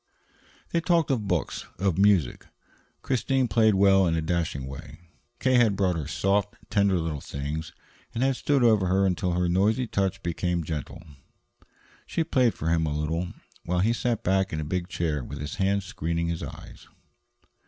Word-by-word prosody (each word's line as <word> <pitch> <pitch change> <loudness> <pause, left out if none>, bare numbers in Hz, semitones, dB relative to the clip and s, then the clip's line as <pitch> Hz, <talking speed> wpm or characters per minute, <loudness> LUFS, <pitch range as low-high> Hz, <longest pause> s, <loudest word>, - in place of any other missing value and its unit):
They 170 - +1
talked 170 -3 +2
of 110 -6 -1
books, 90 -5 -2
of 95 -1 0
music 100 -9 +2 0.6
Christine 130 0 +1
played 110 -3 +3
well 95 -1 +5
in 80 - +1
a 80 - 0
dashing 80 -5 -1
way. 70 +3 -9 0.4
K. 130 -1 +3
had 115 -5 +4
brought 95 -3 +1
her 80 -4 -4
soft, 100 +5 0 0.2
tender 100 -2 +3
little 80 -4 -3
things, 75 +3 -5 0.4
and 115 +2 -1
had 135 0 +2
stood 140 0 +1
over 110 -5 +4
her 95 +2 +3
until 90 -1 0
her 90 0 +1
noisy 105 +8 +2
touch 100 -3 -1
became 85 0 -1
gentle. 80 +2 -5 1.0
She 165 - 0
played 130 -7 +2
for 80 - -2
him 80 -1 +2
a 75 0 -2
little, 85 +3 -2 0.3
while 90 +1 -1
he 110 +4 +2
sat 120 -1 -1
back 95 +1 +1
in 80 - -3
the 75 - -3
big 90 +2 -2
chair 80 -7 -2
with 70 +3 -7
his 75 0 -5
hand 100 +1 +1
screening 85 -2 -2
his 85 -1 -3
eyes. - - -10
95 Hz, 175 wpm, -26 LUFS, 80-105 Hz, 1.0 s, well